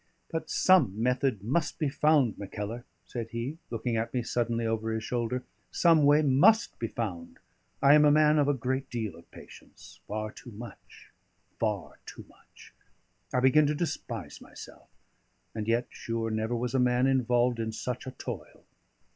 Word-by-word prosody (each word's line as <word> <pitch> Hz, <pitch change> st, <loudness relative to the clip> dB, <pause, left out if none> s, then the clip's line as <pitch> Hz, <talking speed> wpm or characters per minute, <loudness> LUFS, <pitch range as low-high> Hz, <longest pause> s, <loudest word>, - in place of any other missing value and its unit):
"But 160 Hz, -1 st, -4 dB
some 135 Hz, -, +3 dB
method 125 Hz, -3 st, 0 dB
must 150 Hz, +8 st, -1 dB
be 155 Hz, -, 0 dB
found, 145 Hz, -5 st, +2 dB
Mackellar," 105 Hz, +4 st, -6 dB, 0.2 s
said 115 Hz, -2 st, -6 dB
he, 120 Hz, +8 st, -5 dB
looking 115 Hz, 0 st, -2 dB
at 115 Hz, +1 st, -2 dB
me 125 Hz, -, 0 dB
suddenly 115 Hz, 0 st, -1 dB
over 110 Hz, 0 st, -1 dB
his 110 Hz, 0 st, -3 dB
shoulder; 125 Hz, +2 st, -2 dB, 0.3 s
"some 165 Hz, -4 st, +4 dB
way 150 Hz, +2 st, +5 dB
must 170 Hz, -, +4 dB
be 115 Hz, -, -2 dB
found. 95 Hz, -8 st, -5 dB, 0.5 s
I 140 Hz, +1 st, +7 dB
am 150 Hz, 0 st, +7 dB
a 150 Hz, -, +6 dB
man 150 Hz, 0 st, +4 dB
of 145 Hz, -, +3 dB
a 145 Hz, -, +3 dB
great 130 Hz, +2 st, -2 dB
deal 110 Hz, -7 st, -4 dB
of 85 Hz, 0 st, -17 dB
patience -, -, -15 dB
far 110 Hz, +1 st, -4 dB
too 120 Hz, -, -12 dB
much 115 Hz, +3 st, -12 dB, 0.5 s
far 100 Hz, -10 st, -2 dB
too -, -, -10 dB
much. -, -, -19 dB, 0.6 s
I 125 Hz, -, +1 dB
begin 145 Hz, +3 st, +5 dB
to 150 Hz, -, 0 dB
despise 120 Hz, -, -5 dB
myself. -, -, -13 dB, 0.6 s
And 110 Hz, -1 st, -4 dB
yet, 120 Hz, +2 st, +1 dB
sure, 115 Hz, -1 st, -3 dB
never 110 Hz, +2 st, -1 dB
was 120 Hz, 0 st, -2 dB
a 135 Hz, -, +2 dB
man 125 Hz, 0 st, +3 dB
involved 125 Hz, -2 st, +2 dB
in 110 Hz, -1 st, -2 dB
such 125 Hz, +3 st, -5 dB
a -, -, -4 dB
toil!" -, -, -8 dB
120 Hz, 170 wpm, -29 LUFS, 110-140 Hz, 0.6 s, I